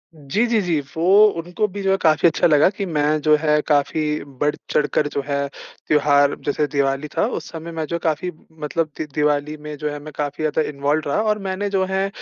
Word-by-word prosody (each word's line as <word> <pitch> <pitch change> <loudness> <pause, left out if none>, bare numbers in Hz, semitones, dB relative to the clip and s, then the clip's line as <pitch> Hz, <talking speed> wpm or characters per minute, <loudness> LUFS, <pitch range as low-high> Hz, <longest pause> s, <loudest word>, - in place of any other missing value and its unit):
जी, 150 - -1
जी, 230 -2 +2
जी। 170 -5 0 0.2
वो 165 - -2 0.4
उनको 180 +6 -1
भी 200 +1 -7
जो 195 - +2
है 195 - +3
काफ़ी 155 +1 +4
अच्छा 165 - +3
लगा 150 +1 +5
कि 200 - -3
मैं 150 -2 +1
जो 155 0 +5
है 150 -1 +2
काफ़ी 150 +1 +1 0.2
बढ़ 150 0 +1 0.2
चढ़कर 145 0 +1
जो 140 -1 -3
है, 140 0 -1 0.4
त्योहार 145 -1 +4
जैसे 150 +1 +1
दिवाली 140 +1 0
था - - +3
उस - - -12
समय 165 0 -7
मैं 160 -1 -3
जो 170 - -2
काफ़ी 165 +3 -1 0.3
मतलब 155 +2 -1
दि 155 - -3
दिवाली 150 0 0
में 150 0 -8
जो 150 0 -3
है 145 0 -5
मैं 155 - -9
काफ़ी 145 +1 -3
ज़्यादा 155 +1 +1
इन्वॉल्व्ड 145 +1 -1
रहा 175 +9 +1
और 215 -1 0
मैंने 190 +2 -2
जो 195 -1 +1
है 195 +1 +1
155 Hz, 215 wpm, -21 LUFS, 145-170 Hz, 0.4 s, लगा